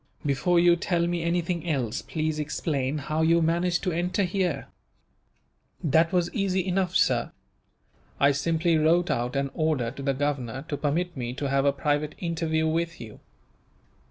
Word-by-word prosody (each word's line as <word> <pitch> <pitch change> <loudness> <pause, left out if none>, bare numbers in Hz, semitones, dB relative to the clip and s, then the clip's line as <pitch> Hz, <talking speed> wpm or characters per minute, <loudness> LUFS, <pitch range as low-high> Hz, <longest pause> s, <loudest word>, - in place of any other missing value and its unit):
"Before 150 +5 +2
you 175 0 +5
tell 170 -1 0
me 175 0 -1
anything 170 0 -1
else, 130 -8 -1
please 155 -1 -2
explain 145 -2 -2
how 155 +2 -2
you 165 +1 +4
managed 170 +2 +1
to 185 - 0
enter 180 +4 0
here." 180 -6 -1 1.2
"That 160 +2 +3
was 175 -2 0
easy 190 -4 0
enough, 185 -1 0
sir. - - +2 0.9
I 140 0 +5
simply 165 +3 +1
wrote 170 +3 +3
out 120 +2 -1
an 140 0 -1
order, 150 -7 0
to 140 - -9
the 135 0 0
governor, 135 -2 -2
to 145 - -2
permit 165 +5 -1
me 120 -2 -4
to 140 0 -3
have 135 0 +2
a 140 - +5
private 145 +1 -1
interview 160 -2 -1
with 165 +1 -1
you. 110 -3 -10
160 Hz, 160 wpm, -26 LUFS, 140-175 Hz, 1.2 s, you